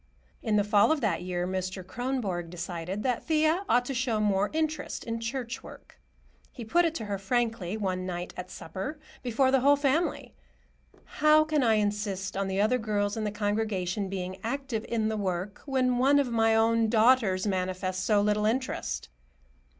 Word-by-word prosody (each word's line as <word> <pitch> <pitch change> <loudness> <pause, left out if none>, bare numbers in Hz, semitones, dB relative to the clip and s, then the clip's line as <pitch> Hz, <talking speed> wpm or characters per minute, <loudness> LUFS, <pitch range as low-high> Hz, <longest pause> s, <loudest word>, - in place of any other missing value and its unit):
In 220 -3 0
the 205 - +4
fall 205 +5 +4
of 315 - +2
that 195 -8 0
year, 180 0 -2
Mr. 185 0 -3
Kronborg 200 -6 -3
decided 175 +3 -5
that 250 -3 0
Thea 315 +3 +2
ought 245 +1 +3
to 270 - -3
show 240 -3 0
more 205 -1 +2
interest 310 -2 -2
in 230 0 -3
church 235 +1 -4
work. - - -14 0.5
He 240 - -8
put 345 +10 +3
it 330 -1 -1
to 225 - -4
her 200 -1 -3
frankly, 220 -2 -1
one 185 -3 -2
night 175 -1 -4
at 180 0 -7
supper, 190 - -6 0.2
before 260 +2 +2
the 270 - +4
whole 285 +3 +5
family. 285 +4 0 0.7
"How 305 +1 +4
can 310 -1 +1
I 225 -3 +4
insist 205 -2 -1
on 195 0 -1
the 190 0 -1
other 230 +5 +3
girls 205 -2 -1
in 220 -1 -2
the 210 - -1
congregation 205 -2 -1
being 185 -1 -4
active 240 -2 -3
in 220 -2 0
the 220 0 -1
work, 190 0 -3
when 255 -2 +1
one 275 +3 +5
of 275 -4 +1
my 225 -1 +3
own 225 0 +3
daughters 220 -4 +4
manifests 185 -1 -1
so 210 0 +3
little 210 +1 +2
interest?" 255 +4 -2
215 Hz, 180 wpm, -28 LUFS, 190-255 Hz, 0.7 s, whole